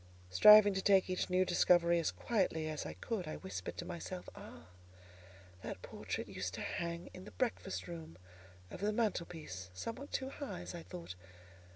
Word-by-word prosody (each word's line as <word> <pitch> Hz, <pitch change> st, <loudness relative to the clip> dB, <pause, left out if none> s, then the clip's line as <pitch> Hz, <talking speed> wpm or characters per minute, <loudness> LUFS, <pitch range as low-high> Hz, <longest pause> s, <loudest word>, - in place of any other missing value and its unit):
Striving 205 Hz, -, +9 dB
to 190 Hz, -, -1 dB
take 190 Hz, -1 st, +4 dB
each 185 Hz, -, -1 dB
new 185 Hz, +1 st, +3 dB
discovery 175 Hz, -1 st, +4 dB
as 165 Hz, -, +1 dB
quietly 185 Hz, -8 st, 0 dB
as 155 Hz, -1 st, -4 dB
I -, -, -5 dB
could, 205 Hz, -8 st, -4 dB
I 155 Hz, -, -4 dB
whispered 190 Hz, -, -6 dB
to 175 Hz, -, -4 dB
myself— 180 Hz, +1 st, -6 dB
"Ah! 80 Hz, +3 st, -12 dB, 0.9 s
that -, -, -6 dB
portrait -, -, -5 dB
used -, -, -4 dB
to -, -, -5 dB
hang 170 Hz, 0 st, -4 dB
in 185 Hz, -, -9 dB
the -, -, -8 dB
breakfast 230 Hz, -6 st, -2 dB
room, 165 Hz, -, -8 dB, 0.5 s
over 195 Hz, -, -7 dB
the 210 Hz, +1 st, +2 dB
mantel 210 Hz, -6 st, 0 dB
piece: 95 Hz, -, -8 dB
somewhat 230 Hz, -, -6 dB
too 265 Hz, 0 st, -2 dB
high, 280 Hz, -, -6 dB
as 90 Hz, +1 st, -7 dB
I -, -, -6 dB
thought. 90 Hz, 0 st, -8 dB
180 Hz, 180 wpm, -35 LUFS, 155-205 Hz, 0.9 s, Striving